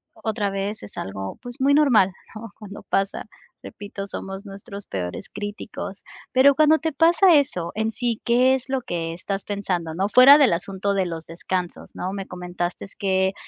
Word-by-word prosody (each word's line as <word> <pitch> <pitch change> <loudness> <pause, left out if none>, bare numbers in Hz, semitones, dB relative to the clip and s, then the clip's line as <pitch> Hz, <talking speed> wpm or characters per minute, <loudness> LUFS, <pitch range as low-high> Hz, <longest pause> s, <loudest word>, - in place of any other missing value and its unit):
otra 220 -2 -2
vez 195 +2 -3
es 105 - -11
algo, 95 0 -5
pues 245 +2 -7
muy 275 +2 +3
normal, 245 -11 +5 0.2
¿no?, 225 0 -8
cuando 205 -1 -10
pasa, 195 0 -1 0.4
repito, 200 -1 -8
somos 195 +1 -7
nuestros 200 0 -9
peores 90 -2 -5
críticos, 205 -1 -6 0.3
pero 265 +2 +6
cuando 310 +1 +5
te 320 -2 -3
pasa 345 +5 +5
eso 270 - +1
en 220 +1 -1
sí, 235 -1 -2
que 250 +2 +4
es 265 0 -3
lo 265 -1 0
que 165 -7 -3
estás 195 +3 -4
pensando, 180 -5 -3
¿no? 190 +3 0
Fuera 255 +6 +9
del 275 - +5
asunto 195 +3 -1
de 190 -2 0
los 165 -1 -6
descansos, 175 +1 -5
¿no? 185 +1 -4
Me 195 -1 -5
comentaste 180 0 -5
que 190 -1 +1
200 Hz, 175 wpm, -23 LUFS, 185-245 Hz, 0.4 s, Fuera